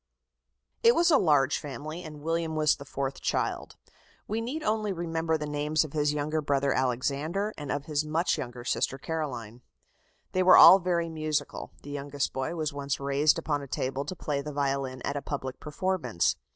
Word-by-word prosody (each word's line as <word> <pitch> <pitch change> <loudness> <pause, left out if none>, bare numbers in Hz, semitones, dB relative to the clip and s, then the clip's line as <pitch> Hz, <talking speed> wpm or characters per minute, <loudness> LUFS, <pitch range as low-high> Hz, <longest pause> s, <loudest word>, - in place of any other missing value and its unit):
It 470 0 +6
was 345 0 +4
a 290 - +6
large 145 -4 +3
family, 150 +4 -6
and 150 -3 -10
William 165 0 -1
was 155 -1 +3
the 140 - -10
fourth 135 -1 -4
child. - - -2 0.5
We 220 +2 -1
need 280 +7 -4
only 215 -1 0
remember 165 -2 -1
the 150 - -4
names 150 +1 0
of 155 - -9
his 150 -1 +2
younger 150 +1 -1
brother 140 -1 +1
Alexander, 145 - -1
and 145 -2 -5
of 145 0 -2
his 150 -1 0
much 160 +3 +1
younger 120 0 -6
sister 135 - -1
Caroline. 125 -7 -5 0.7
They 185 - +1
were 185 0 +8
all 190 - +10
very 175 -2 0
musical 155 -3 -3
the 145 - -8
youngest 145 0 -3
boy 135 +6 -2
was 155 -3 -2
once 140 -1 -3
raised 140 +3 +3
upon 150 -3 -1
a 140 - -8
table 135 +1 -2
to 185 - -5
play 145 -4 -2
the 150 +1 -6
violin 135 -2 -2
at 140 - -2
a - - -3
public 135 -3 -5
performance. 150 - 0
150 Hz, 185 wpm, -28 LUFS, 140-165 Hz, 0.7 s, all